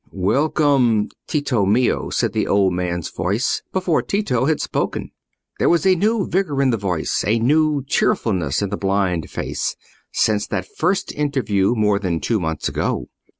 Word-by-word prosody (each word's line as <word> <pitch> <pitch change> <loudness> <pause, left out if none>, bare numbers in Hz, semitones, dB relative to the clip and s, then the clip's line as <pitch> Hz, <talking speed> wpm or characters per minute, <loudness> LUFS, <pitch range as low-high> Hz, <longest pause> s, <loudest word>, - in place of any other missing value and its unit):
"Welcome, 125 +2 +2 0.2
Tito 140 -8 0
mio," 110 +6 +1
said 115 -4 0
the 110 -2 0
old 100 -2 +3
man's 90 -2 -3
voice, 105 +7 -1
before 185 -4 +1
Tito 130 - 0
had 155 +1 +1
spoken. - - -2 0.5
There - - +3
was 170 +2 +2
a 190 - +6
new 205 +3 +1
vigour 175 -7 -1
in 130 - +3
the 115 - 0
voice, 90 -6 -1
a 110 +2 +3
new 150 +4 +2
cheerfulness 95 - 0
in 100 - -1
the 100 - -2
blind 95 -4 0
face, - - -3 0.4
since 105 -2 +1
that 100 -3 -2
first 185 +4 0
interview 125 -8 0
more 105 -2 +2
than 90 -5 -1
two 115 +4 0
months 80 -3 -2
ago. - - -2
115 Hz, 160 wpm, -20 LUFS, 100-150 Hz, 0.5 s, a